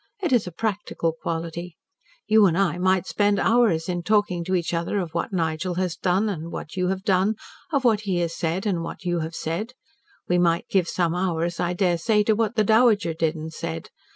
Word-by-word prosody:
It 330 Hz, -7 st, +1 dB
is 235 Hz, -6 st, +3 dB
a -, -, -5 dB
practical 200 Hz, -3 st, -2 dB
quality. 165 Hz, +1 st, -5 dB, 0.5 s
You 215 Hz, -2 st, +5 dB
and 170 Hz, -2 st, +1 dB
I 180 Hz, -3 st, +1 dB
might 185 Hz, 0 st, +2 dB
spend 205 Hz, 0 st, +1 dB
hours 215 Hz, -9 st, +3 dB
in 175 Hz, -1 st, -2 dB
talking 190 Hz, -2 st, +1 dB
to 185 Hz, +1 st, 0 dB
each 175 Hz, -1 st, -1 dB
other 170 Hz, +4 st, -1 dB
of 175 Hz, -4 st, -4 dB
what 170 Hz, +4 st, -2 dB
Nigel 170 Hz, 0 st, -1 dB
has 180 Hz, -1 st, -1 dB
done 190 Hz, +4 st, +1 dB
and 170 Hz, -5 st, -4 dB
what 155 Hz, -, -7 dB
you 180 Hz, -1 st, 0 dB
have 190 Hz, 0 st, -2 dB
done, 195 Hz, +1 st, +2 dB, 0.4 s
of 280 Hz, -4 st, +1 dB
what 220 Hz, -4 st, +3 dB
he 195 Hz, -4 st, -1 dB
has 170 Hz, -1 st, -2 dB
said, 175 Hz, +3 st, -2 dB
and 190 Hz, -5 st, 0 dB
of -, -, -4 dB
what 180 Hz, -, -8 dB
you 175 Hz, -1 st, 0 dB
have 160 Hz, +1 st, -4 dB
said. 180 Hz, +11 st, -3 dB, 0.5 s
We 180 Hz, 0 st, +2 dB
might 170 Hz, -1 st, +2 dB
give 185 Hz, -3 st, +2 dB
some 170 Hz, -2 st, 0 dB
hours, 175 Hz, -2 st, -1 dB
I 175 Hz, 0 st, 0 dB
daresay, 185 Hz, +4 st, +2 dB
to 220 Hz, -, +3 dB
what 225 Hz, +1 st, 0 dB
the 215 Hz, -, +3 dB
Dowager 220 Hz, -5 st, +4 dB
did 160 Hz, 0 st, 0 dB
and 160 Hz, 0 st, -7 dB
said. 80 Hz, -, -5 dB
180 Hz, 215 wpm, -24 LUFS, 170-205 Hz, 0.5 s, You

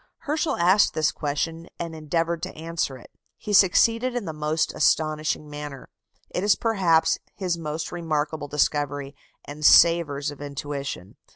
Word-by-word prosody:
Herschel 310 Hz, +1 st, -1 dB
asked 185 Hz, +4 st, +4 dB
this 155 Hz, -1 st, +2 dB
question 165 Hz, +3 st, -3 dB
and 170 Hz, -1 st, -5 dB
endeavoured 165 Hz, +2 st, -2 dB
to -, -, -6 dB
answer 165 Hz, -4 st, -3 dB
it. 120 Hz, -, -16 dB, 0.3 s
He 210 Hz, -, -5 dB
succeeded 230 Hz, +6 st, +4 dB
in 240 Hz, -4 st, -2 dB
the 160 Hz, -, -4 dB
most 155 Hz, +1 st, -1 dB
astonishing 155 Hz, 0 st, +1 dB
manner. 145 Hz, -2 st, -8 dB, 0.4 s
It 180 Hz, -, -2 dB
is, 205 Hz, 0 st, +4 dB
perhaps, 185 Hz, -8 st, +2 dB, 0.2 s
his 185 Hz, -4 st, -1 dB
most 155 Hz, -1 st, -5 dB
remarkable 155 Hz, -3 st, -2 dB
discovery, 145 Hz, -1 st, -1 dB, 0.3 s
and 150 Hz, +1 st, -9 dB
savours 150 Hz, -3 st, +5 dB
of 145 Hz, -, -12 dB
intuition. 140 Hz, -8 st, -6 dB
155 Hz, 145 wpm, -24 LUFS, 145-170 Hz, 0.4 s, savours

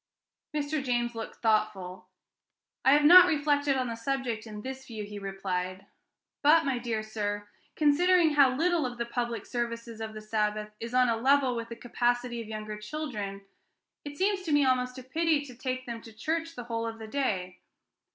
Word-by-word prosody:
Mr. 295 Hz, 0 st, -1 dB
James 240 Hz, -2 st, 0 dB
looked 225 Hz, -1 st, -6 dB
thoughtful. 195 Hz, -5 st, 0 dB, 0.8 s
"I 265 Hz, -, +6 dB
have 295 Hz, 0 st, +4 dB
not 360 Hz, +3 st, +10 dB
reflected 290 Hz, -3 st, +2 dB
on 255 Hz, -, 0 dB
the 230 Hz, -2 st, -3 dB
subject 235 Hz, -2 st, -3 dB
in 210 Hz, -1 st, -8 dB
this 265 Hz, 0 st, -7 dB
view," 220 Hz, -3 st, -6 dB
he 205 Hz, 0 st, -7 dB
replied. 190 Hz, -1 st, -4 dB, 0.6 s
"But, 315 Hz, +2 st, +5 dB
my 265 Hz, -3 st, 0 dB
dear 230 Hz, -3 st, -2 dB
sir, 205 Hz, -1 st, -3 dB, 0.3 s
considering 325 Hz, +3 st, +4 dB
how 275 Hz, -3 st, +5 dB
little 340 Hz, +2 st, +2 dB
of 245 Hz, -1 st, -8 dB
the 235 Hz, -, -2 dB
public 235 Hz, -2 st, -3 dB
services 230 Hz, -2 st, -4 dB
of 220 Hz, -1 st, -5 dB
the -, -, -5 dB
Sabbath 215 Hz, 0 st, -1 dB
is 230 Hz, +2 st, -5 dB
on 255 Hz, 0 st, +5 dB
a 230 Hz, -1 st, +1 dB
level 265 Hz, +1 st, +3 dB
with 230 Hz, -1 st, -4 dB
the 230 Hz, -, -6 dB
capacity 240 Hz, 0 st, -1 dB
of 225 Hz, -, -9 dB
younger 215 Hz, -1 st, -6 dB
children, 210 Hz, -6 st, -5 dB, 0.6 s
it 290 Hz, 0 st, -8 dB
seems 390 Hz, 0 st, +1 dB
to 345 Hz, -4 st, -4 dB
me 290 Hz, -1 st, +4 dB
almost 250 Hz, 0 st, +1 dB
a 255 Hz, -, -8 dB
pity 310 Hz, +2 st, +1 dB
to 255 Hz, -, -10 dB
take 255 Hz, +1 st, -4 dB
them 235 Hz, -1 st, -6 dB
to 225 Hz, -, -12 dB
church 325 Hz, +9 st, -3 dB
the 245 Hz, -, -6 dB
whole 230 Hz, -1 st, -3 dB
of 225 Hz, 0 st, -5 dB
the 220 Hz, -1 st, -8 dB
day." 190 Hz, -8 st, -2 dB
240 Hz, 190 wpm, -29 LUFS, 215-285 Hz, 0.8 s, not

